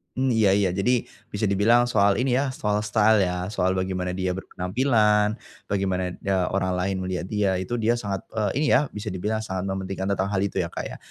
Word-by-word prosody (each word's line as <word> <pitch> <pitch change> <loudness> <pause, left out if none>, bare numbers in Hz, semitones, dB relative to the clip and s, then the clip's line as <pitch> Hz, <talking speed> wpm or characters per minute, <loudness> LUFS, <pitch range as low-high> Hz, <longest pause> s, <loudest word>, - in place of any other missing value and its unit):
Hmm, 130 +1 0
iya 105 -3 +4
iya. 100 -1 +3
Jadi 120 +5 +1 0.2
bisa 105 +1 -1
dibilang 115 +5 +3
soal 100 -3 +3
ini 125 0 +1
ya, 135 +1 +1
soal 105 -4 -1
style 110 -1 +3
ya. 90 0 -2
Soal 95 -3 0
bagaimana 95 -1 -2
dia 90 0 -2
berpenampilan, 105 +2 +1 0.3
bagaimana 95 -2 0
ne 100 - -1 0.2
orang 95 -1 0
lain 95 +2 -1
melihat 95 -1 -3
dia 100 -3 +1
itu, 95 +6 -3
dia 115 +2 +2
sangat, 100 -5 -4
eee, 105 -3 0
ini 155 - +1
ya 145 0 +1
bisa 105 +1 -7
dibilang 105 +3 -2
sangat 95 -4 -4
mementingkan 95 0 -3
tentang 95 0 0
hal 100 -1 0
itu 100 -1 -2
ya, 85 - 0
Kak, - - -6
ya. - - -7
100 Hz, 205 wpm, -24 LUFS, 95-110 Hz, 0.3 s, iya